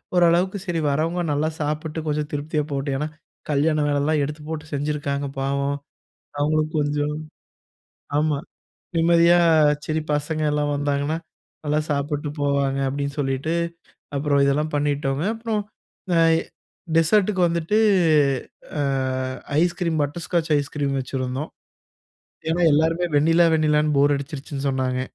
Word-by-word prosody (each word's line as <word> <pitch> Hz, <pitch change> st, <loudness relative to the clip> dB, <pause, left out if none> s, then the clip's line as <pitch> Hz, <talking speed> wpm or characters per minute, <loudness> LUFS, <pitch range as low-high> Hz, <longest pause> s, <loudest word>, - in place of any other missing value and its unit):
ஓரளவுக்கு 180 Hz, +3 st, +3 dB
சரி 170 Hz, -3 st, -1 dB
வரவுங்க 165 Hz, +4 st, 0 dB
நல்லா 150 Hz, +2 st, +1 dB
சாப்பிட்டு 155 Hz, +1 st, -2 dB
கொஞ்சம் 150 Hz, 0 st, -1 dB
திருப்தியா 150 Hz, +1 st, -1 dB
போகட்டும். 140 Hz, -1 st, -2 dB
ஏனா 150 Hz, +2 st, -2 dB, 0.4 s
கல்யாண 150 Hz, +2 st, +2 dB
வேலைலாம் 145 Hz, +1 st, +1 dB
எடுத்து 150 Hz, +2 st, -5 dB
போட்டு 160 Hz, 0 st, -4 dB
செஞ்சிருக்காங்க 145 Hz, -1 st, -2 dB
பாவம். 140 Hz, +1 st, -1 dB, 0.6 s
அவங்களும் 155 Hz, +1 st, +1 dB
கொஞ்சம். 145 Hz, 0 st, 0 dB, 1.0 s
ஆமா 150 Hz, -2 st, +1 dB, 0.6 s
நிம்மதியா 170 Hz, +1 st, +5 dB, 0.5 s
சரி 155 Hz, 0 st, -1 dB
பசங்க 155 Hz, +1 st, -1 dB
எல்லாம் 145 Hz, 0 st, 0 dB
வந்தாங்கன்னா, 145 Hz, +2 st, 0 dB, 0.5 s
நல்லா 150 Hz, +1 st, +1 dB
சாப்பிட்டு 145 Hz, +1 st, -1 dB
போவாங்க 140 Hz, -1 st, +1 dB
அப்படின்னு 140 Hz, +1 st, -3 dB
சொல்லிட்டு, 135 Hz, +4 st, -1 dB, 0.6 s
அப்புறம் 140 Hz, 0 st, +2 dB
இதெல்லாம் 150 Hz, +2 st, 0 dB
பண்ணிட்டோங்க. 145 Hz, 0 st, 0 dB
அப்புறம் 225 Hz, -2 st, -2 dB, 0.4 s
இந்த 180 Hz, -2 st, 0 dB, 0.2 s
ஐ -, -, +4 dB, 0.6 s
டெசர்டுக்கு 190 Hz, +3 st, +3 dB
வந்துட்டு 170 Hz, +5 st, 0 dB, 1.0 s
ஆ -, -, +2 dB, 0.8 s
ஐஸ்கிரீம், 170 Hz, -2 st, 0 dB
பட்டர்ஸ்காட்ச் 165 Hz, +2 st, -2 dB
ஐஸ்கிரீம் 140 Hz, -1 st, -2 dB
வச்சுருந்தோம். 130 Hz, +2 st, -3 dB, 1.0 s
ஏனா 175 Hz, +2 st, +1 dB
எல்லோருமே 165 Hz, +3 st, +2 dB
வெண்ணிலா, 165 Hz, +3 st, +4 dB
வெண்ணிலான்னு 150 Hz, -1 st, +2 dB
போர் 145 Hz, +1 st, +4 dB
அடிச்சிருச்சுன்னு 140 Hz, 0 st, -5 dB
சொன்னாங்க. 130 Hz, -1 st, -1 dB
150 Hz, 115 wpm, -23 LUFS, 140-160 Hz, 1.0 s, நிம்மதியா